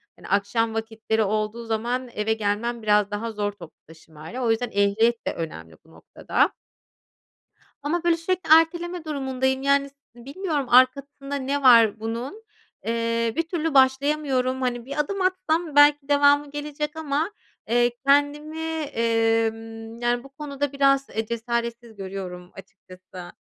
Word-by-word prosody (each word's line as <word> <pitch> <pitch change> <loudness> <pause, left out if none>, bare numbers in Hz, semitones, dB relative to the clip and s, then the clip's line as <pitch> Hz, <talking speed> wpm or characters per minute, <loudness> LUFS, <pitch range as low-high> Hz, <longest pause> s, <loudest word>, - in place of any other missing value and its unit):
Hani, - - -13
akşam 220 +3 +1
vakitleri 220 0 -1
olduğu 215 +3 -2
zaman 240 +3 -2
eve 210 +1 0
gelmem 220 +2 -2
biraz 210 -1 +3
daha 225 +2 -3
zor 205 -1 -2
toplu 175 -5 -14
taşımayla, 160 +7 -10
o 230 - +2
yüzden 235 +1 -1
ehliyet 215 +4 +1
de - - 0
önemli 80 - -7
bu 160 - -21
noktada. - - -1 1.3
Ama 340 +4 -1
böyle 340 -1 +3
sürekli 365 0 -3
erteleme 345 +1 +2
durumundayım, 265 -2 -1
yani, 280 0 +2
s 280 - -34 0.2
bilmiyorum 285 +2 -4
arkasında 275 +3 +2
ne 280 +1 -2
var 230 -4 +6
bunun, 240 - -5 0.4
eee, 230 0 0
bir 330 - +2
türlü 325 -3 -2
başlayamıyorum, 265 -1 +2
hani, 245 -1 -2
bir 280 +2 -5
adım 390 +6 -1
atsam 350 -4 0
belki 290 -1 +5
devamı 285 0 +4
gelecek 300 +1 -4
ama, 315 +4 -2 0.4
eee, 240 0 +3
kendimi, 290 +3 +2 0.2
emm, 225 -1 -1
yani, 240 +1 0
bu 275 - -13
konuda 285 0 -4
biraz, 275 -1 +2
eee, 220 +1 -3
cesaretsiz 235 0 -4
görüyorum 185 -2 -7
açıkçası. 185 -2 -13
245 Hz, 140 wpm, -24 LUFS, 220-285 Hz, 1.3 s, var